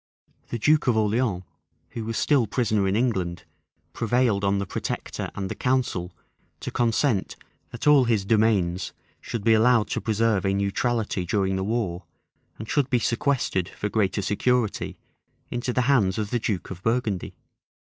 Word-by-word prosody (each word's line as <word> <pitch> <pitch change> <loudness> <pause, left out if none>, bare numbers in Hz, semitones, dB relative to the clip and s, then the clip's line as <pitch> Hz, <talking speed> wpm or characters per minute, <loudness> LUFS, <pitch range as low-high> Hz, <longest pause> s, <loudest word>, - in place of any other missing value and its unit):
The 120 - -2
duke 150 +6 +3
of 120 -3 +3
Orleans, 110 -3 +1 0.5
who 115 - -6
was 115 0 -3
still 135 -7 +3
prisoner 110 -3 +1
in 95 - +1
England, 95 -8 -1 0.5
prevailed 115 -3 +1
on 100 0 +2
the 100 - -1
protector - - -4
and 95 - -3
the - - -4
council 125 -9 -1 0.5
to - - -4
consent 115 -2 +1 0.3
that 120 - -7
all 145 -3 +6
his 110 -5 +1
demesnes 100 -5 +1 0.3
should 115 -4 -5
be 115 - +5
allowed 115 0 +4
to - - -2
preserve 110 -3 +1
a 95 0 +1
neutrality 100 0 0
during 95 +1 0
the 95 - -1
war, 95 -5 -2 0.5
and 110 - -7
should 140 0 +1
be 125 - +3
sequestered, 115 -6 0
for 105 - -4
greater 100 -2 0
security, 120 +2 0 0.5
into 120 +1 -2
the 125 - +1
hands 115 -8 +2
of 105 -2 -3
the 120 - +1
duke 100 -5 -3
of 90 -1 -7
Burgundy. 115 -4 -1
110 Hz, 160 wpm, -25 LUFS, 95-120 Hz, 0.5 s, all